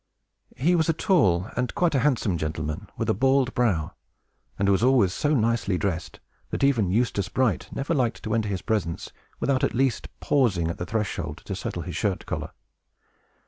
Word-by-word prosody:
He 165 +7 +3
was 160 -1 +2
a - - +4
tall 110 - +2
and 125 0 -2
quite 175 -3 +2
a 135 - +3
handsome 120 -8 +1
gentleman, 75 -1 -4
with - - -2
a - - +3
bald 130 +3 +2
brow; 100 -11 +1 0.6
and 100 - +1
was 100 0 +3
always 120 -7 +4
so 150 +1 +1
nicely 115 -5 +1
dressed, 85 -4 -3 0.3
that - - -3
even 120 -9 +3
Eustace 100 -2 0
Bright 125 -5 0
never 140 +5 -2
liked 120 -6 0
to 110 - -2
enter 110 -2 0
his 95 -3 -3
presence 100 -8 -2 0.3
without 140 0 +1
at 140 - +1
least 130 0 +1
pausing 100 - +2
at 85 - -5
the 90 - -4
threshold 110 -1 -3
to - - -4
settle - - -4
his - - -6
shirt - - -1
collar. - - -4
115 Hz, 185 wpm, -25 LUFS, 95-135 Hz, 0.6 s, a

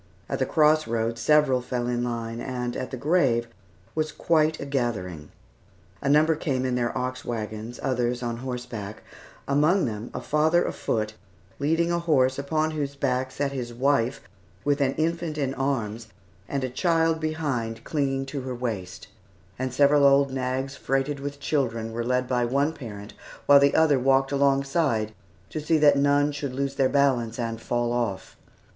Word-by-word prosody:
At - - -3
the - - +1
cross 155 0 +3
road 115 0 -1
several 140 0 +3
fell 125 -1 -3
in 120 0 -1
line, 115 -1 -3
and 125 -2 -3
at 130 - -4
the 130 - -5
grave 135 -5 +2 0.5
was 155 -1 -1
quite 155 -1 +1
a - - -5
gathering. 105 - -3 0.7
A 140 - -1
number 155 +2 +4
came 135 -4 -1
in 130 - 0
their 120 -1 -1
ox 130 0 -3
wagons, 110 0 -5
others 125 -2 0
on 120 -1 -2
horseback; 120 -5 -6 0.4
among 155 +7 +3
them, 110 -1 -4
a - - -5
father 155 +6 +2
afoot, 110 -1 -2 0.5
leading 165 +4 +1
a 170 - +1
horse 135 -6 +2
upon 155 +3 0
whose 145 -2 -3
back 130 -2 0
sat 140 +2 -2
his 120 -3 -5
wife 135 -1 +1 0.4
with 145 0 +1
an 135 -1 +2
infant 165 -1 -1
in 135 -2 -1
arms 120 -5 -2 0.4
and 140 -1 -2
a 130 - -1
child 165 +2 +2
behind 135 -8 -2
clinging 135 -3 -1
to 135 0 -5
her 130 -1 -5
waist; 110 -7 -5 0.5
and 130 0 -2
several 145 +2 +4
old 140 0 +5
nags, 130 +1 -2
freighted 135 +2 -1
with 140 0 -6
children, 115 -6 -1
were 115 +1 -3
led 125 +1 0
by 125 -1 +1
one 140 +6 +1
parent, 105 -7 -9 0.3
while 145 0 +8
the 140 0 +3
other 155 -4 +4
walked 135 +1 +3
alongside 140 -5 +1 0.4
to 155 - -3
see 160 +2 +2
that 145 -2 +6
none 145 +1 +3
should 145 -2 -4
lose 135 +1 -2
their 135 -1 +2
balance 130 -5 +2
and 115 -2 -3
fall 120 0 -1
off. 115 -6 -2
135 Hz, 170 wpm, -25 LUFS, 120-145 Hz, 0.7 s, while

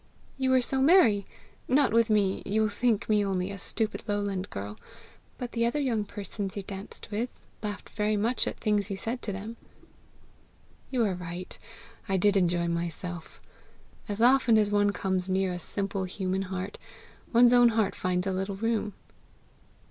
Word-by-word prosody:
"You 265 -1 0
were 260 -1 +5
so 265 +2 0
merry 265 - +5 0.4
not 270 -2 +3
with 230 0 +4
me 205 -3 +2
you 215 +2 +1
think 220 0 0
me 210 -1 +3
only 190 -1 -1
a 195 - -7
stupid 220 +3 -2
lowland 200 -2 -2
girl; 100 +2 -6 0.6
but 245 -1 -5
the 230 - 0
other 235 +5 +1
young 235 -7 0
persons 200 -1 -5
you 200 - -3
danced 195 +2 -6
with, 225 +4 -1 0.3
laughed 205 -2 -5
very 210 -1 0
much 230 +5 +1
at - - -3
things 210 -2 +1
you 195 - -3
said 235 +5 -3
to 210 - -3
them." 210 +4 -6 1.3
"You 250 -4 +1
are 200 - 0
right; 180 0 -6 0.5
I 190 - +2
did 205 +2 +3
enjoy 175 -2 +2
myself. 170 0 -4 0.7
As 205 +2 0
often 250 -2 +5
as 210 -1 +2
one 205 0 +3
comes 190 -2 -1
near 190 -1 +1
a 175 - -4
simple 195 +2 -2
human 190 0 -2
heart, 190 +2 -5 0.5
one's 240 +1 +6
own 245 -1 +7
heart 220 -3 +1
finds 180 0 -1
a 195 - 0
little 190 +1 -2
room." 220 0 -1
205 Hz, 170 wpm, -28 LUFS, 190-230 Hz, 1.3 s, own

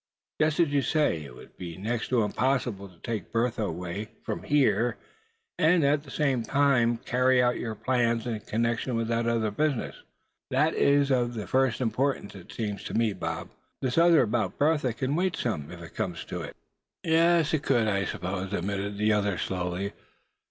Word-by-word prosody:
"Just 155 +1 +2
as 170 -3 +4
you 145 -1 +2
say, 130 - +1
it 65 -3 -11
would - - -14
be 85 -3 -7
next 110 +4 -2
to 120 -3 +2
impossible 110 -3 -1
to 90 - -20
take 115 -3 -4
Bertha 115 0 0
away 90 +4 -4 0.2
from - - -4
here, 130 -5 +2 0.6
and 165 +1 +4
at 140 +1 +3
the 145 - -15
same 135 -3 +1
time 120 -1 +2
carry 125 +2 +2
out 125 -1 +2
your 110 -2 -4
plans 120 0 +1
in 115 -3 -2
connection 115 +3 -1
with 115 0 -1
that 115 0 0
other 115 -2 +1
business. 145 +2 -1 0.5
That - - +2
is 140 0 +3
of 120 -2 +1
the 105 -2 -4
first 130 -2 +1
importance, 125 -1 -1
it 95 -3 -12
seems 105 -4 -4
to - - -5
me, 115 -2 +2
Bob. - - -5 0.3
This 130 +3 0
other 170 -3 +6
about 110 -4 -1
Bertha 145 -4 +2
can 130 +3 -2
wait 180 0 +1
some, 80 - -3
if 85 0 -9
it 80 - -11
comes - - -3
to - - -5
it." - - -8 0.5
"Yes, 165 -1 +3
it 155 - +2
could, 120 -6 +2
I 100 -2 +1
suppose," 95 +2 -4
admitted 100 +2 -2
the 105 +1 +3
other, 100 -3 +1
slowly. 90 +3 -3
115 Hz, 185 wpm, -27 LUFS, 105-135 Hz, 0.6 s, other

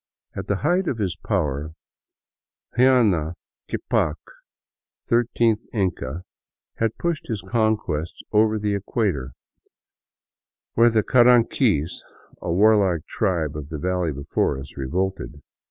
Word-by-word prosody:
At - - -5
the 100 - +1
height 175 - +1
of 125 - -1
his 95 -7 -1
power 75 -6 -2 1.0
Huayna 110 -11 +3 0.3
Ccapac, 75 - 0 0.9
thir 120 +1 +3
teenth 115 -1 +2
Inca, 90 - -2 0.5
had 115 -1 -1
pushed 170 -3 -2
his 110 -4 -3
conquests 110 -9 -1
over 110 0 +3
the 105 -1 -1
equator, 100 - -1 1.4
when 120 +1 +5
the 110 -1 +3
Car 120 +2 +5
anquis, 115 - +3 0.4
a 85 - -3
warlike 95 -3 +3
tribe 85 -8 -1
of 75 -1 -6
the 80 - -5
valley 90 +1 -1
before 70 -1 -1
us, 70 +1 -10
revolted. 85 +3 -3
100 Hz, 120 wpm, -23 LUFS, 80-115 Hz, 1.4 s, when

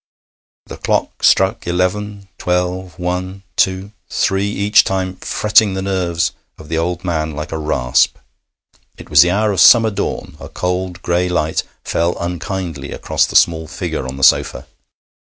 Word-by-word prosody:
The - - -9
clock - - -2
struck 95 -2 +3
eleven, 100 +3 -2
twelve, 90 0 -2
one, 90 +2 -4
two, 95 +2 0 0.2
three, 95 +1 0
each 105 0 +3
time 95 -1 -2
fretting 105 -2 +2
the 95 - -3
nerves 90 -4 -1 0.3
of 75 - -13
the 80 - -1
old 90 +2 -3
man 80 -3 -2
like 75 0 -6
a 80 - -3
rasp. 70 -5 +1 0.8
It - - -13
was 75 0 +8
the 90 - +4
hour 105 +3 +1
of 95 - -2
summer 115 +4 +7
dawn. 100 0 -4
A - - -9
cold 90 -1 -3
gray 90 +1 0
light 80 -3 0 0.2
fell 85 +1 -1
unkindly 85 -4 -4
across - - 0
the - - -8
small 80 -1 +3
figure 65 - -4
on 65 +1 -7
the 70 - -5
sofa. - - +3
90 Hz, 155 wpm, -17 LUFS, 85-95 Hz, 0.8 s, was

